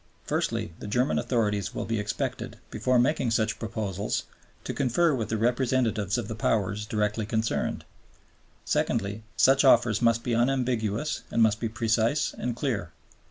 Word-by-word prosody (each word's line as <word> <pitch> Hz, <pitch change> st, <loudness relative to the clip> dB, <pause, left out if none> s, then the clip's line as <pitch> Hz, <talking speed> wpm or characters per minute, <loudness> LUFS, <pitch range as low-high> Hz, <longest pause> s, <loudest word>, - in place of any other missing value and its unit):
"Firstly, 85 Hz, -, -2 dB
the -, -, -7 dB
German 125 Hz, +6 st, +1 dB
authorities 105 Hz, -5 st, -1 dB
will -, -, -2 dB
be 115 Hz, -1 st, -1 dB
expected, 105 Hz, 0 st, -3 dB
before 125 Hz, 0 st, +1 dB
making 130 Hz, 0 st, +2 dB
such 110 Hz, -1 st, 0 dB
proposals, 105 Hz, -3 st, -2 dB, 0.4 s
to -, -, -4 dB
confer 145 Hz, +5 st, +2 dB
with 115 Hz, -5 st, -2 dB
the 110 Hz, -, 0 dB
representatives 120 Hz, -3 st, +1 dB
of 120 Hz, -4 st, -3 dB
the 110 Hz, -, -4 dB
Powers 105 Hz, -1 st, 0 dB
directly 105 Hz, 0 st, -1 dB
concerned. 110 Hz, 0 st, -1 dB, 0.8 s
Secondly, 100 Hz, +2 st, 0 dB, 0.2 s
such 135 Hz, +1 st, +5 dB
offers 120 Hz, -5 st, +4 dB
must 115 Hz, -1 st, +3 dB
be 120 Hz, -, -1 dB
unambiguous 125 Hz, +1 st, 0 dB
and 115 Hz, -, +3 dB
must 110 Hz, -1 st, +3 dB
be 115 Hz, -, -2 dB
precise 115 Hz, +5 st, +1 dB
and 120 Hz, -1 st, -3 dB
clear. 115 Hz, -, -2 dB
115 Hz, 150 wpm, -27 LUFS, 105-125 Hz, 0.8 s, such